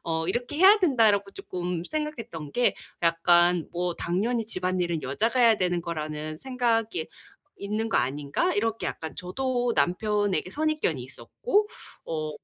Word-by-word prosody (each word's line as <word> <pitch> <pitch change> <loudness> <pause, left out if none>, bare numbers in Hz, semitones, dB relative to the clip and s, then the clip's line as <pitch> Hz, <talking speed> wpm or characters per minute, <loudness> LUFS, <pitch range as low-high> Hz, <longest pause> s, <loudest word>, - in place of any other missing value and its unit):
어 165 0 -1
이렇게 245 +8 -2
해야 390 +4 +8
된다.'라고 220 - +3
쪼끔 180 - -4
생각했던 240 - -5
게 245 - +2 0.3
약간 175 0 +4
뭐 175 0 -1
'당연히 220 +8 -1
집안일은 180 -5 -1
여자가 225 - 0
해야 230 -3 +6
되는 175 -1 0
거라는 155 -2 -4
생각이 225 -6 -1 0.5
있는 215 +3 -2
거 - - +1
아닌가?' 140 +1 0
이렇게 225 +2 -1
약간 160 -4 -6
저도 245 +5 -1
남편에게 205 -1 +1
선입견이 305 - -1
있었고 405 - -1 0.4
어 155 -1 -3
185 Hz, 315 characters per minute, -26 LUFS, 165-240 Hz, 0.5 s, 해야